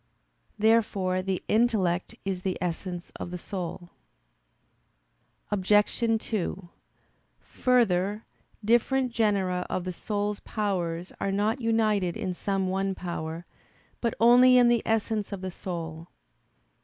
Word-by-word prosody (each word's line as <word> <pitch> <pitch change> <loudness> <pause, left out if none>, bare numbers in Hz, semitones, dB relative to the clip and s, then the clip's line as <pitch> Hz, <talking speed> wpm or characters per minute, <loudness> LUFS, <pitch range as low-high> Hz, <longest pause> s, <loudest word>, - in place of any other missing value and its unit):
Therefore 210 -4 +2
the 185 -1 -2
intellect 210 -6 +1
is 190 -2 -2
the 185 -1 -2
essence 180 0 -4
of - - -5
the 180 - -5
soul. 175 -1 -6 1.6
Obj. 205 +1 +2 0.3
2: 190 -4 -3 0.7
Further, 210 -4 +1 0.4
different 250 +3 +2
genera 200 -6 +1
of 185 - -2
the 185 0 -4
soul's 205 +2 -2
powers 180 -5 -2
are 195 - 0
not 215 +6 0
united 215 -6 +1
in 185 - -2
some 195 +1 -1
one 195 +1 -1
power, 170 -1 -5 0.6
but 235 -2 0
only 250 +2 +7
in 245 -1 +6
the 240 -2 +3
essence 220 -1 0
of 200 -2 -5
the 185 -1 -4
soul. 165 -2 -6
195 Hz, 120 wpm, -27 LUFS, 180-220 Hz, 1.6 s, only